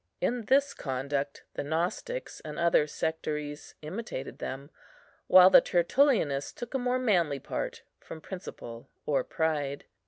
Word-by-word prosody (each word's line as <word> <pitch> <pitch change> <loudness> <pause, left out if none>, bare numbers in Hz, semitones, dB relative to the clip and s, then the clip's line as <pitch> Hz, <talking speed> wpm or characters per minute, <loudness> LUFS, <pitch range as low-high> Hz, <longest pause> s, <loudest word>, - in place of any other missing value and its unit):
In 240 -2 -1
this 275 +3 +3
conduct 140 +1 -3
the - - -3
Gnostics 175 - -3
and 150 -1 -8
other 170 -3 +3
sectaries 150 -1 -4
imitated 160 - -6
them, 140 +3 -6 0.6
while 185 0 +8
the - - +9
Tertullianists 175 - +2
took 240 +1 -7
a 265 - +1
more 250 0 +1
manly 180 - +2
part, - - -5 0.2
from 160 - -9
principle 135 -9 -8 0.2
or 140 -3 +1
pride. 145 -3 -1
160 Hz, 130 wpm, -29 LUFS, 145-220 Hz, 0.6 s, the